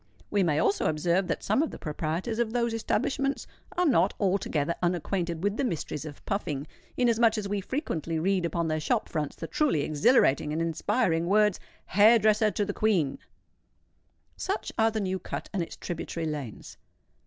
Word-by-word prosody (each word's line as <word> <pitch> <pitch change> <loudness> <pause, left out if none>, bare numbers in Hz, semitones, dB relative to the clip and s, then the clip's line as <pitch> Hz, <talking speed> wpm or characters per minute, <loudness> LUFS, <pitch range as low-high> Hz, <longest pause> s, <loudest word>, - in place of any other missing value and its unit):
We 205 - +2
may 160 -5 +2
also 195 - +2
observe 170 +4 +1
that 165 - -2
some 215 +7 +2
of 320 - 0
the - - -8
proprietors 165 +9 -3
of 230 -2 0
those 235 -1 +1
establishments 275 +4 -1 0.3
are 360 - +3
not 205 - +3
altogether 175 -6 0
unacquainted 175 -1 -1
with 205 +1 0
the - - 0
mysteries 160 - -3
of 145 -2 -10
puffing; 150 -8 -2 0.3
inasmuch 235 -2 +3
as 205 -2 -2
we 200 0 -1
frequently 170 - -3
read 185 +3 +1
upon 170 0 -1
their 155 0 0
shop 215 +9 0
fronts 150 -3 -3
the 165 - -6
truly 270 - +1
exhilarating 150 - +3
and 155 - -1
inspiring 165 +1 0
words, 210 +1 +3 0.3
"Hair 215 +4 +6
dresser 215 0 +3
to 205 0 -1
the 205 - -3
Queen." 185 -12 +1 1.2
Such 390 +2 -3
are 225 0 +3
the 220 -1 -2
New 190 -1 -1
Cut - - -6
and 195 - 0
its 165 - -5
tributary 165 -1 -4
lanes. 145 -8 -6
190 Hz, 175 wpm, -28 LUFS, 160-220 Hz, 1.2 s, Hair